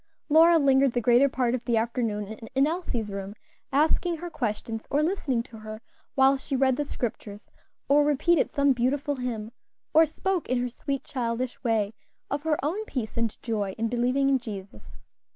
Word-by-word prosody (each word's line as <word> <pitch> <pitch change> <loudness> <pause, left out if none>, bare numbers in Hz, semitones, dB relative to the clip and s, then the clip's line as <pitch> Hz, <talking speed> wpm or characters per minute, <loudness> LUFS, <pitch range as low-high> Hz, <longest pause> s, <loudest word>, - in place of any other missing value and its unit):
'" - - -52
Lora 330 +1 +7
lingered 270 -3 +4
the 245 - +1
greater 245 +4 +4
part 250 -2 0
of 250 -1 -2
the 235 -2 +2
afternoon 225 -3 -1 0.3
in 270 +1 +4
Elsie's 290 - -2
room, 195 +1 -6 0.4
asking 320 +4 +2
her 345 +2 -7
questions, 225 -3 -3
or 290 +2 +2
listening 295 -9 0
to 230 - -13
her 215 0 -8 0.4
while 270 0 +5
she 270 +1 -4
read 260 -1 +3
the 295 - -1
Scriptures, 215 -5 -5 0.4
or 290 +1 +5
repeated 295 +3 +2
some 280 -1 +3
beautiful 270 +3 0
hymn, 230 -3 -4 0.4
or 320 +1 +6
spoke 370 +3 -2
in 255 0 +1
her 245 0 -1
sweet, 275 +3 -4
childish 250 -3 -3
way, 220 -3 +1 0.4
of 285 +1 -1
her 310 -1 +1
own 375 +9 -1
peace 245 - -4
and 230 -2 -2
joy 205 -5 -2
in 225 0 -1
believing 250 +3 +1
in 270 -1 +3
Jesus. 200 -5 -10
255 Hz, 180 wpm, -26 LUFS, 230-285 Hz, 0.4 s, Lora